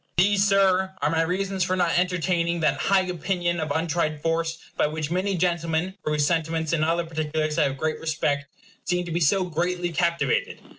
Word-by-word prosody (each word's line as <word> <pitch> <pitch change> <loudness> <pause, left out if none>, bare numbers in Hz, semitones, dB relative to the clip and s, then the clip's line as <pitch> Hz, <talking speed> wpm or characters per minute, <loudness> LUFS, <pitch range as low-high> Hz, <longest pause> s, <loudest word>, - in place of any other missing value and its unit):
These, 200 +2 +4
Sir, 190 -1 +3
are 150 - +1
my 165 0 +2
reasons 190 +3 -1
for 185 0 0
not 175 -2 +1
entertaining 175 -1 0
that 145 -3 +2
high 195 -1 +4
opinion 175 -1 -1
of 155 0 -2
untried 160 0 -1
force 165 +1 -1 0.2
by - - +2
which 155 0 -4
many 185 +2 0
gentlemen, 170 0 0
for 150 - -1
whose 150 -1 +2
sentiments 160 0 0
in 155 -2 +1
other 165 +1 +1
particulars 155 -1 -2
I - - +4
have 135 0 -2
great 155 +2 -2
respect, 150 -3 -1 0.4
seem 180 0 -1
to 175 - -6
be 170 - 0
so 185 +4 +3
greatly 175 +1 -2
captivated. 170 - 0
170 Hz, 190 wpm, -25 LUFS, 160-180 Hz, 0.4 s, These